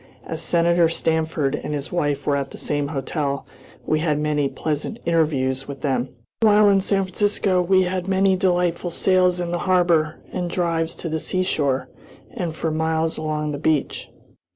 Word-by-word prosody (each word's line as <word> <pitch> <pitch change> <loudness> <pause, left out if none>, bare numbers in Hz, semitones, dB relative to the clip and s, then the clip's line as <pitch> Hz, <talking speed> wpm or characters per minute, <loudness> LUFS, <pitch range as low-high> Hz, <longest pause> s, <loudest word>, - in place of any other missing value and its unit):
As 160 0 -4
Senator 170 -1 +3
Stanford 160 -3 0
and 150 0 -3
his 140 0 -5
wife 145 -5 -1
were 145 - +2
at 140 -1 -2
the - - -10
same 145 -1 -1
hotel, 140 0 -3 0.4
we 155 - +1
had 155 -2 +1
many 150 -2 0
pleasant 155 +11 -3
interviews 135 -6 +1
with 140 -2 -8
them. 130 -3 0 0.3
While 210 -1 +6
in 195 -1 +4
San 195 0 +1
Francisco 190 -1 +1
we 185 +1 +3
had 180 0 -2
many 190 0 +3
delightful 180 -2 +1
sails 180 +1 +2
in 175 -1 -2
the 175 - -1
harbor 170 -4 +3 0.2
and 180 -1 -2
drives 165 -2 -1
to - - -6
the 160 0 -1
seashore 150 -8 -1 0.5
and 175 -9 -4
for 160 0 -2
miles 160 0 0
along 150 -1 -2
the 145 - -4
beach. 155 -2 -1
160 Hz, 170 wpm, -22 LUFS, 150-180 Hz, 0.5 s, While